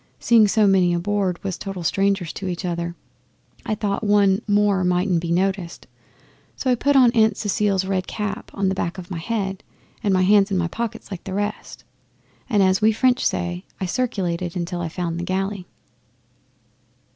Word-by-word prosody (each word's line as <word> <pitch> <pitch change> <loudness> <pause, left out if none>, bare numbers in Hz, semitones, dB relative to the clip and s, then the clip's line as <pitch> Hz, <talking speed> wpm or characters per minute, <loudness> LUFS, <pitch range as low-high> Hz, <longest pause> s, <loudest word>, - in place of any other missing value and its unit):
Seeing 225 -3 +5
so 215 +1 +3
many 185 -3 +4
aboard 190 0 -1
was 190 -3 -4
total 195 -3 -5
strangers 195 0 0
to 195 - -5
each 180 +1 -4
other, 170 -1 -3 0.7
I 215 - 0
thought 205 0 -2
one 205 -1 +3
more 205 -2 +2
mightn't 180 0 +1
be 170 -1 -3
noticed; 185 -1 -1 0.7
so 260 - -1
I - - +5
put 280 +4 +1
Aunt 230 -5 +4
Cecile's 200 -2 0
red 190 -1 -1
cap 210 -1 -4
on 200 -1 0
the 190 - +1
back 175 -1 -3
of 185 0 -9
my 170 - -3
head, 195 0 -3 0.4
and 205 - +1
my 185 -1 +3
hands 200 +1 +4
in 195 - 0
my 175 -1 0
pockets 230 +1 -5
like 190 - -6
the 190 - -4
rest, 205 +1 -4 0.7
and, 205 -5 +3
as 190 +1 +2
we 220 +1 +5
French 250 +3 +2
say, 175 +1 -1 0.2
I 190 - -2
circulated 180 -6 -2
till 175 0 -4
I 170 - -3
found 170 0 -3
the - - -3
galley. 190 +1 -3
195 Hz, 180 wpm, -22 LUFS, 180-210 Hz, 0.7 s, Seeing